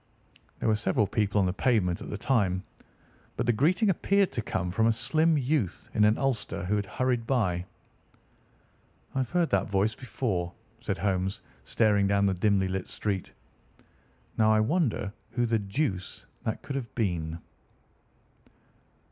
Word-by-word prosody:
There - - -2
were 110 - +4
several 105 0 +1
people 105 0 0
on 95 - +3
the 90 - 0
pavement 100 -7 +1
at - - -7
the 105 - -4
time, 100 -6 +1 0.7
but - - 0
the 120 - +3
greeting 170 - +2
appeared 200 +2 +2
to 120 - -2
come 90 -4 -2
from 110 +5 +2
a - - +5
slim 155 +7 +2
youth 130 - -1
in 105 - +4
an 105 +2 +4
ulster 130 -9 -1
who 100 +4 +1
had 100 -1 -1
hurried 125 -1 -1
by. 90 -9 0 1.5
"I've 130 -3 -1
heard 175 0 +1
that 100 0 +1
voice 100 +3 +2
before," 110 -8 -3 0.3
said - - -3
Holmes, 95 0 -1 0.2
staring 105 -3 +3
down 100 0 +2
the 95 - +2
dimly 95 +1 +2
lit 95 0 -3
street. 100 -3 -3 1.1
"Now, 110 0 +5
I 110 - +4
wonder 115 - 0 0.2
who 120 +1 +1
the 115 -1 +1
deuce 100 - -3 0.2
that 110 - -2
could 140 - -5
have 125 -5 -5
been." 85 -7 -1
105 Hz, 155 wpm, -28 LUFS, 95-125 Hz, 1.5 s, a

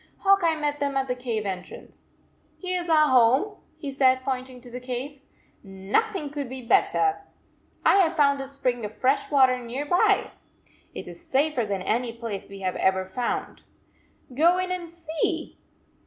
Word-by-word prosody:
Hawk 395 0 +5
Eye 330 -1 +3
met 290 -1 -1
them 280 -1 -1
at 270 0 0
the 250 - 0
cave 240 -4 -3
entrance. 185 -2 -8 0.5
Here 365 -1 -2
s 345 -1 -5
our 305 -2 +5
home, 260 - +4 0.2
he 290 -3 -5
said, 260 -1 +3
point 260 -1 -2
ing 250 -1 -12
to 245 -1 -13
the 250 - -6
cave. 255 +3 -6 0.3
" - - -37 0.3
Nothing 390 -10 +1
could 285 -3 -4
be 260 0 -7
better. 400 - +2 0.6
I - - +6
have 345 -4 +3
found 280 -3 +3
a 270 - -4
spring 255 -4 -2
of 210 +1 -6
fresh 265 +2 +1
water 260 -3 +4
near 250 +4 -5
123 - - -16
by! 355 - 0 0.2
It - - -8
is 345 - -10
safer 280 -6 0
than 195 -2 -2
any 235 +3 -1
place 230 -4 -6
we 195 0 -10
have 185 -1 -2
ever 190 0 +1
found. 235 +6 -3 0.7
Go 335 +7 +4
in 365 0 -2
and 350 -2 -4
see!" 330 -2 -3
270 Hz, 185 wpm, -25 LUFS, 245-315 Hz, 0.7 s, I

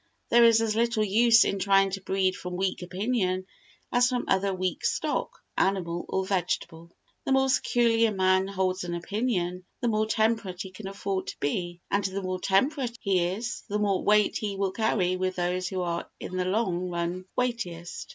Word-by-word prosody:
There 235 0 +6
is 230 -1 +6
as 220 -1 0
little 230 -1 +2
use 230 +3 +5
in 200 - -1
trying 195 0 +3
to 195 0 -4
breed 190 -1 0
from 180 0 -6
weak 190 0 -1
opinion 185 0 -1 0.5
as 245 0 +4
from 250 -1 -1
other 195 +1 +2
weak 185 -1 -2
stock, - - 0 0.3
animal 175 -3 0
or 190 0 0
vegetable. 175 -3 -2 0.3
The - - -2
more 265 0 +3
securely 235 -3 +3
a - - -1
man 190 -1 +2
holds 185 -1 -1
an 175 -1 -3
opinion, 180 -1 -2 0.2
the 240 - 0
more 215 0 +1
temperate 220 -4 0
he 190 - -9
can 190 +2 -8
afford 195 -1 -3
to - - -6
be, 175 +4 -2
and 200 +1 +2
the 195 0 -3
more 185 0 -2
temperate 245 +6 +1
he 185 -3 +1
is, 220 +7 -4
the 205 - 0
more 200 -3 +1
weight 210 0 +3
he 205 -2 -3
will 195 -1 0
carry 185 -4 +1
with 185 0 -1
those 180 +1 -1
who 185 0 -3
are 170 -1 -3
in 185 - -6
the 180 0 0
long 185 -3 0
run 175 +1 -3
weightiest. 220 -9 -3
195 Hz, 190 wpm, -27 LUFS, 185-220 Hz, 0.5 s, There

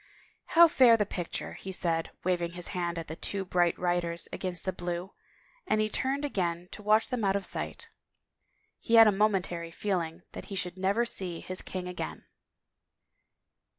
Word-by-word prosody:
" - - -38
How 340 0 +10
fair 250 -7 +6
the 210 - +1
picture," 175 -3 -4
he 190 - -7
said, 165 -3 0
waving 175 -2 0
his 175 -1 -4
hand 175 -3 -2
at 165 - -5
the 160 - -6
two 195 +3 -2
bright 175 -2 +2
riders 175 -1 0
against 180 -3 -3
the 190 - -1
blue, 175 +1 -4 0.5
and 215 - +2
he 215 0 +1
turned 275 +6 -1
again 175 -8 -2
to - - -8
watch 215 +1 +3
them 250 -4 -2
out 195 -1 +2
of 200 - -1
sight. - - -5 0.9
He 230 - +1
had 225 0 +10
a 215 - +6
momentary 190 -5 0
feeling 175 -2 -2
that - - -8
he 200 - -7
should 180 -2 -2
never 200 +5 +2
see 180 -7 -2
his 185 0 -3
king 185 -1 -5
again. 80 - -6
185 Hz, 180 wpm, -29 LUFS, 175-210 Hz, 0.9 s, How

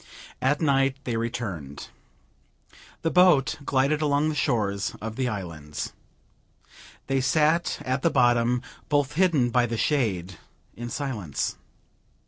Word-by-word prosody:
At 145 +4 +1
night 135 -2 +2
they 120 -3 -2
returned. 110 - -4 1.1
The 165 - +1
boat 180 -9 +4
glided 140 +3 +1
along 150 0 +2
the - - -1
shores 105 -9 0
of 110 0 -5
the 130 0 0
islands. 85 -8 -5 1.1
They 135 -1 0
sat 155 +5 +2
at 130 +1 -1
the 165 - +3
bottom, 120 -2 +3 0.3
both 145 -2 +1
hidden 155 -8 +2
by 120 0 +3
the 115 0 -3
shade, 95 - 0 0.4
in 120 +1 -6
silence. 115 - -3
130 Hz, 120 wpm, -26 LUFS, 110-145 Hz, 1.1 s, boat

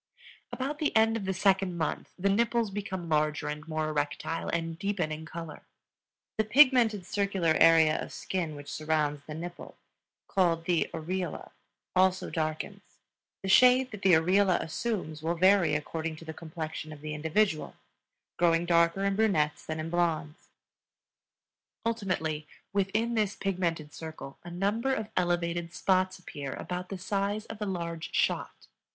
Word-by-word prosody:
About 280 +3 -3
the 305 - 0
end 225 0 +4
of 215 -4 -3
the 190 - 0
second 190 -1 +2
month 160 - -2
the 195 +2 0
nipples 230 0 +1
become 190 -3 -4
larger 155 -1 +1
and 150 +1 -5
more 155 -1 -1
erectile, 150 +2 -2
and 165 0 -2
deepen 195 -5 -1
in 155 +1 -6
color. 165 -1 -7 0.8
The - - +5
pigmented, 230 -4 +5
circular 195 -5 +1
area 160 -2 +6
of - - -7
skin 170 -5 -3
which 145 0 -10
surrounds 150 -1 0
the 150 - -7
nipple, 175 +2 -8 0.5
called 170 -3 +1
the 175 -2 +1
areola, 180 +3 -4 0.4
also 185 0 +3
darkens. 155 -2 -4 0.5
The 190 - -2
shade 250 +4 +6
that 210 -3 -8
the 190 -3 +5
areola 180 +3 +4
assumes 165 -4 -3
will 165 +2 0
vary 180 -3 +4
according 160 +2 -3
to 165 - -12
the 160 - -6
complexion 155 -1 -6
of 150 -2 -10
the 155 0 -5
individual, 160 +3 0 0.6
growing 170 0 +3
darker 170 +2 +3
in 200 0 +1
brunettes 195 -9 +1
than 155 0 -4
in 160 +1 -4
blondes. 165 -3 -1 1.4
Ultimately, 185 -9 -1 0.3
within 210 +4 +1
this 210 -3 +1
pigmented 170 -6 -2
circle 160 -4 -8
a 175 - -8
number 210 +9 0
of 215 -3 -4
elevated 175 -1 0
spots 185 -1 +2
appear 145 -6 -6
about 180 0 -5
the 195 - -4
size 200 +3 -1
of 220 -1 -9
a 210 - -1
large 170 -3 -4
shot. - - 0
175 Hz, 150 wpm, -29 LUFS, 160-200 Hz, 1.4 s, area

